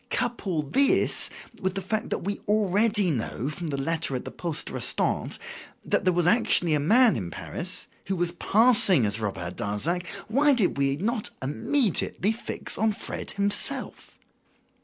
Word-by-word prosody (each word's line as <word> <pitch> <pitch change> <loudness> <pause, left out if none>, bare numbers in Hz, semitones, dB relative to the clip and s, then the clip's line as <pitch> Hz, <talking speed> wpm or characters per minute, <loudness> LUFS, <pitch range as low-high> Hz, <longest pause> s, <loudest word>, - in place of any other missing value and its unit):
Couple 205 -10 -2
this 270 - +2 0.3
with 190 0 -2
the 195 - -1
fact 220 +3 -3
we 200 +2 -3
already 210 -1 +2
knew, 125 0 -3
from 170 +2 -5
the 140 -2 -3
letter 145 0 -1
at 125 - -5
the - - -7
poste 165 -4 -2
restante, - - -1 0.5
that - - 0
there 185 - +4
was 175 -1 +1
actually 180 -4 +3
a 150 - +2
man 230 - +5
in 95 -7 -4
Paris - - -5 0.2
who 190 - -1
was 175 -1 0
passing 200 - +4
as 105 +1 -1
Robert 95 -5 -4
Darzac, 165 - -1 0.2
why 280 +6 +3
did 215 -7 +1
we 140 0 +1
not 215 - -2
immediately 205 - 0
fix 225 - -4
on 220 -1 +2
Fred - - -4
himself? 200 0 0
180 Hz, 155 wpm, -26 LUFS, 145-215 Hz, 0.5 s, man